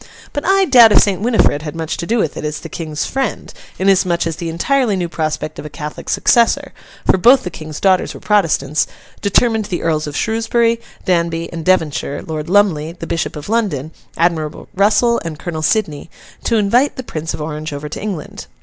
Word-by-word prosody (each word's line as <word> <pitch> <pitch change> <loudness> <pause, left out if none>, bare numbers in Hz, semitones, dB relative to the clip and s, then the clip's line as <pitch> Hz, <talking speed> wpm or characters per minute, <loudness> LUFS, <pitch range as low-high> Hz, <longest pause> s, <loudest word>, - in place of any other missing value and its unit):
But 290 - -2
I 390 0 +4
doubt 240 -9 +7
if - - +5
Saint 195 -2 -1
Winifred 220 -10 +2
had 150 0 -6
much 160 -1 -3
to 170 - -4
do 235 - +1
with 165 -9 0
it - - -6
as 150 0 -3
the 165 - -8
King's 155 -3 -4
friend, 265 -5 -3 0.2
inasmuch 185 -3 +2
as 165 -2 -3
the 170 - -4
entirely 225 +7 +1
new 180 -2 -1
prospect 155 -2 -3
of - - -7
a - - -10
Catholic 150 0 -7
successor 235 -1 +2 0.3
(for 190 - +3
both 250 +7 +6
the 180 - -5
King's 155 -1 -8
daughters 190 -2 +2
were - - -9
Protestants) 155 -8 +1 0.3
determined 220 +2 +2
the 185 -3 -4
Earls 155 -2 0
of 145 - -5
Shrewsbury, 230 +1 +1 0.2
Danby, 170 -2 0
and 165 -1 -5
Devonshire, 160 -6 0
Lord 155 0 -5
Lumley, 175 -6 +2
the 170 -1 -8
Bishop 165 -1 -2
of 150 -1 -7
London, 195 - -1 0.3
Admiral 160 -2 -1
Russell, 215 +4 +3
and 165 -2 -5
Colonel 160 -1 -5
Sidney, 155 -5 0 0.4
to 230 - +2
invite 235 +7 +2
the 260 - -6
Prince 160 -7 -4
of - - -10
Orange 155 0 -5
over 145 +1 -5
to 150 - -7
England. 190 -7 -6
170 Hz, 195 wpm, -17 LUFS, 155-215 Hz, 0.4 s, doubt